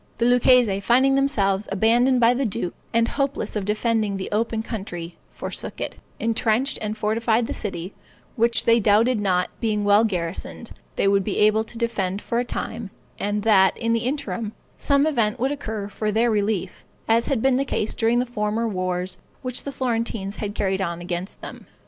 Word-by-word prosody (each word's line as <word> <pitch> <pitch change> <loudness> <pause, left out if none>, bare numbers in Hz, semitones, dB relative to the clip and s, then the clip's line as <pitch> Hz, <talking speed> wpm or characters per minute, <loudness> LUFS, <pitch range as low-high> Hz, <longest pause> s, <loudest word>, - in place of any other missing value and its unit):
The 235 - +1
Lucchese, 245 -4 +4
finding 255 +6 +4
themselves 215 -8 +1
abandoned 240 +6 +3
by 235 0 +5
the 265 +2 -1
duke, 195 -6 -2 0.2
and 230 0 +3
hopeless 275 -2 -2
of 205 -2 -2
defending 215 -1 0
the 190 - -5
open 225 +1 0
country, 180 -7 -6
forsook - - -5
it; - - -4 0.2
entrenched 230 +3 +1
and 215 0 -3
fortified 225 +2 +1
the - - -4
city, 185 -3 -5 0.4
which 235 0 +2
they 230 0 +5
doubted 220 +3 +3
not, 180 -3 +1
being 215 -3 0
well 205 +2 +5
garrisoned, 185 +3 -3 0.2
they - - +1
would 195 0 +3
be 200 - -2
able 215 +1 +4
to 230 - -11
defend 200 -5 -1
for 235 +2 -2
a - - +1
time, 230 -3 -5 0.3
and 205 0 -1
that, 195 -4 +4
in 230 -1 0
the 230 +1 0
interim, 240 -6 -3 0.3
some 280 0 +3
event 230 -9 +1
would 265 +3 +1
occur 220 -8 -4
for 210 +1 -2
their 230 +3 +2
relief, 205 -2 -1 0.2
as 230 +1 +3
had 275 -5 +1
been 265 -1 +4
the 275 - +2
case 220 -5 -1
during 230 +1 +2
the 250 - +2
former 225 -1 -1
wars 185 -2 -2 0.2
which 255 -1 -4
the 280 - -3
Florentines 230 -6 -2
had 205 -1 -4
carried 195 -1 0
on 170 -2 -2
against 175 +2 -5
them. - - -9
220 Hz, 185 wpm, -23 LUFS, 200-235 Hz, 0.4 s, by